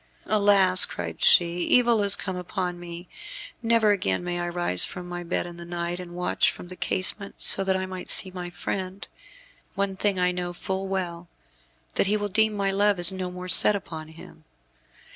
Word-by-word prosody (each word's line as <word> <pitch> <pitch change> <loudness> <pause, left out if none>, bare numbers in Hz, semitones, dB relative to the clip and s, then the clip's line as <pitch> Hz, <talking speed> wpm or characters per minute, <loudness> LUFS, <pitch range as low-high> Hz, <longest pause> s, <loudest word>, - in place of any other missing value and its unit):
"Alas," 200 -3 +4
cried 85 -2 -5
she, 170 0 +4
"evil 235 +5 +2
is 200 -1 +5
come 185 -2 -6
upon 180 0 -5
me. 175 0 -10 0.5
Never 230 -2 +2
again 95 - -1
may 175 0 -4
I 175 0 -3
rise 175 - +2
from 180 -1 -2
my 175 0 -6
bed 175 +1 -2
in 175 -1 -10
the 170 - -10
night, 175 0 -5
and 175 -1 -10
watch 180 0 0
from 175 - -10
the 185 - -9
casement, 195 +2 -2
so 195 - +1
that 190 0 0
I 190 - -3
may 185 -1 -8
see 190 - 0
my 180 -1 -7
friend. 185 +2 -6 0.7
One 200 -1 -2
thing 200 0 -1
I 180 0 +2
know 180 0 -5
full 190 +2 -4
well, 175 -3 -5 0.7
that - - +1
he 210 +2 +1
will 205 0 -4
deem 220 +2 +2
my 200 -1 -1
love 200 0 +2
is 175 +1 +6
no 185 -1 -5
more 180 0 -9
set 205 +3 +9
upon 160 -5 -7
him. 160 +1 -15
185 Hz, 195 wpm, -24 LUFS, 175-195 Hz, 0.7 s, set